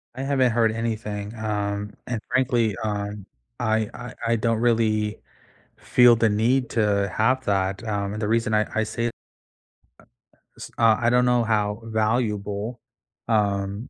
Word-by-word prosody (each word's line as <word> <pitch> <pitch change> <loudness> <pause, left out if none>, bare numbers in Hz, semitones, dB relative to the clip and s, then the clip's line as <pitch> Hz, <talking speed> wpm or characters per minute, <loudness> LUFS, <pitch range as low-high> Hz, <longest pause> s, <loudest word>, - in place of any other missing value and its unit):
I 130 - -4
haven't 135 -3 +2
heard 115 -1 +2
anything, 110 -2 -4
um, 105 -1 -3
and 120 -2 -2
frankly, 120 -5 +1
um, 105 -1 -3 0.3
I 110 -2 0
I 125 0 -8
I 115 - +3
don't 115 0 0
really 110 -3 +1 0.6
feel 120 -1 +5
the 115 0 +3
need 120 +5 +1
to 100 -3 +1
have 130 +4 +2
that, 95 0 0
um, 100 -1 -2
and 110 - -5
the 105 - 0
reason 115 -1 +1
I 105 0 +2
I 110 - +1
say 115 +2 -3
uh, - - +1
eh, - - -4 1.5
s - - -9
uh, 115 -2 +4
I 120 0 +2
don't 125 0 +3
know 125 -1 +3
how 105 -1 0
valuable, 110 0 -1 0.5
um, 100 0 0
110 Hz, 155 wpm, -24 LUFS, 105-115 Hz, 1.5 s, feel